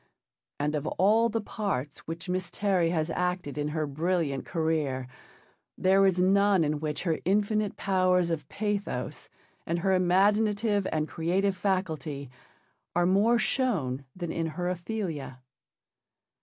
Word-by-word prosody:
And 150 +1 0
of 150 0 -2
all 220 +5 +3
the 225 0 -1
parts 195 - -3
which 165 +3 -6
Miss 185 0 -2
Terry 190 -5 +1
has 165 -1 0
acted 180 -4 -2
in 145 0 -1
her 155 0 -1
brilliant 155 -1 -1
career, 155 -6 -1 0.7
there 190 +1 +4
is 185 -1 +1
none 195 0 +4
in 150 0 0
which 150 -1 -3
her 165 -4 0
infinite 210 +2 +1
powers 185 -2 +2
of 150 -4 -3
pathos 205 0 -3 0.3
and 170 - -1
her 190 +2 +1
imaginative 205 +3 +2
and 155 -1 0
creative 185 +5 0
faculty 160 -8 -2 0.6
are 175 0 +3
more 205 +6 +4
shown 195 - 0
than 175 -3 -4
in 165 -1 -1
her 180 0 -1
Ophelia. 175 - -4
180 Hz, 135 wpm, -28 LUFS, 155-200 Hz, 0.7 s, there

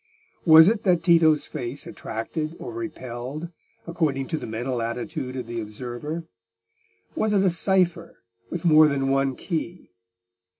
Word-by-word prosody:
Was 160 +1 +9
it 215 0 +2
that 180 -6 +2
Tito's 165 -3 +4
face 135 0 -6
attracted 155 0 -5
or 370 - -7
repelled 145 - -6 0.4
according 150 -6 -1
to 160 - -1
the - - -7
mental 120 +2 -3
attitude 125 +3 -4
of 125 -2 -4
the 115 0 -4
observer? 120 +9 -6 0.9
Was 215 -9 0
it 195 -1 +3
a 190 - +3
cypher 175 -1 0 0.3
with 175 0 -5
more 155 -2 +7
than 135 -2 0
one 135 -1 +1
key? 170 - -5
155 Hz, 140 wpm, -24 LUFS, 125-170 Hz, 0.9 s, Was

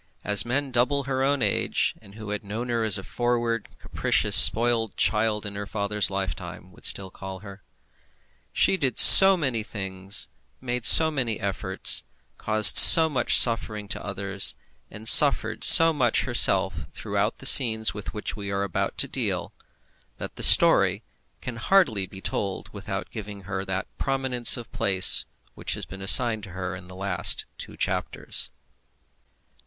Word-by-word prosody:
as 105 0 +2
men 135 +2 -4
double 125 +3 -2
her 130 0 -5
own 140 -1 -2
age, - - -3
and 100 - -19
who 110 -1 -10
had 105 0 -7
known 110 +5 -8
her 115 -1 -3
as 105 -2 0
a 95 - -10
forward, 120 -1 -5
capricious, - - -1
spoilt 115 -1 +4
child 105 -1 -2
in 100 - -8
her 100 0 -9
father's 105 0 -3
lifetime, 95 -2 -8
would - - -6
still 95 -1 -4
call 95 -1 -11
her. 100 -1 -14 0.9
She 190 - -1
did 135 -8 -4
so 195 -1 +9
many 130 -9 -4
things, 95 -2 -5 0.3
made 125 -2 -6
so 160 -1 +5
many 125 -7 -4
efforts, 95 -1 -2 0.4
caused 110 0 +4
so 160 -1 +9
much 140 - +1
suffering 110 -3 +2
to - - -7
others, 100 -1 -2 0.3
and 110 +2 -7
suffered - - +5
so 165 0 +6
much 125 -6 -2
herself - - 0
throughout - - -5
the - - -12
scenes 110 -3 +3
with 105 -1 -9
which 105 -1 -8
we 100 -2 -9
are 100 0 -4
about 100 -4 -6
to - - -3
deal, - - -5 0.6
that - - -10
the - - -9
story - - +3 0.4
can 120 -1 -9
hardly 120 - -1
be 95 0 -13
told 95 0 -7
without - - -9
giving 105 -2 -11
her 95 0 -7
that 95 -1 -6
prominence 130 -3 0
of 120 - -12
place 95 -2 0 0.3
which - - -5
has - - -7
been 95 +1 -13
assigned 110 +3 +2
to 100 -3 -14
her 90 0 -7
in 90 0 -14
the 90 - -14
last 95 -2 -3
two - - -12
chapters. - - -2
105 Hz, 160 wpm, -22 LUFS, 100-120 Hz, 0.9 s, so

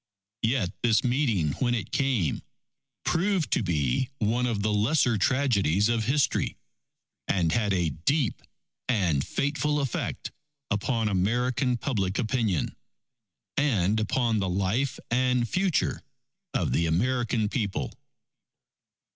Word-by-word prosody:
Yet 110 -5 +1
this 115 -2 +3
meeting 120 - +1
when 120 -2 +2
it 110 - -4
came, 125 - 0 0.6
proved 185 -1 +1
to - - +2
be 85 - 0
one 120 +2 +1
of 110 -4 -1
the 105 0 +1
lesser 120 +3 +2
tragedies 105 - +2
of 115 -2 +1
history, 140 +4 +1 0.7
and 85 -4 +1
had 105 +1 +1
a 90 -4 +1
deep 125 - 0 0.5
and 90 - +2
fateful 150 +1 0
effect 135 -4 -3 0.4
upon 110 +2 0
American 120 +6 +1
public 100 -7 -1
opinion, 110 - 0 0.8
and 110 -7 +2
upon 115 0 +1
the 95 -2 -1
life 100 +9 0
and 125 0 +2
future 185 - 0 0.5
of - - +1
the 85 - +1
American 115 +5 +1
People. 105 -3 -2
115 Hz, 115 wpm, -27 LUFS, 100-130 Hz, 0.8 s, this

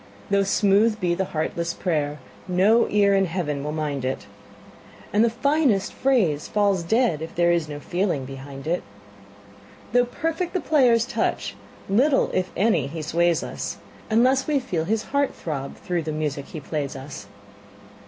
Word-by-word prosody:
Though 200 0 +4
smooth 205 +2 +3
be 175 -2 +1
the 190 +2 -1
heartless 170 +1 -2
prayer, 150 -5 -1 0.3
no 195 +6 +4
ear 200 -1 +4
in 195 0 +3
Heaven 160 -5 -2
will 150 - -3
mind 150 -3 -2
it, 130 +1 -3 0.9
And 210 +2 +4
the 235 - +4
finest 255 -3 +1
phrase 210 - +1
falls 200 -3 +2
dead 215 - +1
if 160 - -7
there 175 0 +3
is 170 -3 0
no 145 0 -5
feeling 175 -4 -1
behind 135 +1 -9
it. 170 +3 0 1.1
Though 245 0 +5
perfect 325 +7 -3
the 370 - +1
player's 250 -9 +3
touch, - - -2 0.3
little, 265 +8 +3
if 185 0 0
any, 185 - +2
he 155 +2 -6
sways 170 +1 +1
us, - - -5 0.3
Unless 255 +4 +3
we 295 -2 +2
feel 175 -11 -2
his 220 +4 0
heart 280 0 0
throb 140 -4 -5
through 175 -2 -2
the 155 0 -4
music 150 -2 -3
he 155 - -8
plays 145 -1 -4
us. 135 -6 -8
180 Hz, 165 wpm, -24 LUFS, 155-225 Hz, 1.1 s, Though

